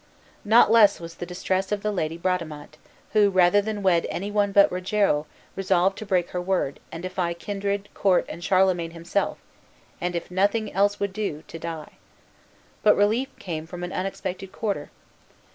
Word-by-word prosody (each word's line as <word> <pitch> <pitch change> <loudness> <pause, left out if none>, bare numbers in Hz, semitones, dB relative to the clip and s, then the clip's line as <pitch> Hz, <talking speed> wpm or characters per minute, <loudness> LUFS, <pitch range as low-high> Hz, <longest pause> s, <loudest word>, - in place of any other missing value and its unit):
Not 220 0 +5
less 215 -3 +6
was 165 0 -8
the 175 - -7
distress 185 +2 -2
of 205 -1 -1
the 210 - 0
lady 165 -4 -2
Bradamante, 160 -4 -3 0.3
who, 210 -2 +5
rather 185 +1 +4
than 210 -1 -4
wed 175 -3 +3
any 200 +3 -4
one 205 -1 +1
but 200 0 +6
Rogero, 180 -4 +1 0.3
resolved 190 0 +2
to 215 - -7
break 180 -3 +1
her 180 - -2
word, 180 -6 -1
and 165 +1 -7
defy 180 -2 -2
kindred, 200 +2 -3
court, 190 -3 +2
and 170 +2 -8
Charlemagne 180 -3 +2
himself; 170 +4 -1 0.6
and, 180 0 -2
if 170 - -4
nothing 205 +4 +1
else 205 +2 +2
would 200 -1 -2
do, 190 -7 -3
to 165 - -8
die. 160 -2 -7 0.8
But 210 - +5
relief 220 +6 +2
came 160 -3 -5
from 175 +1 -7
an 175 - -5
unexpected 190 0 -4
quarter. 210 -3 -3
185 Hz, 170 wpm, -25 LUFS, 170-205 Hz, 0.8 s, less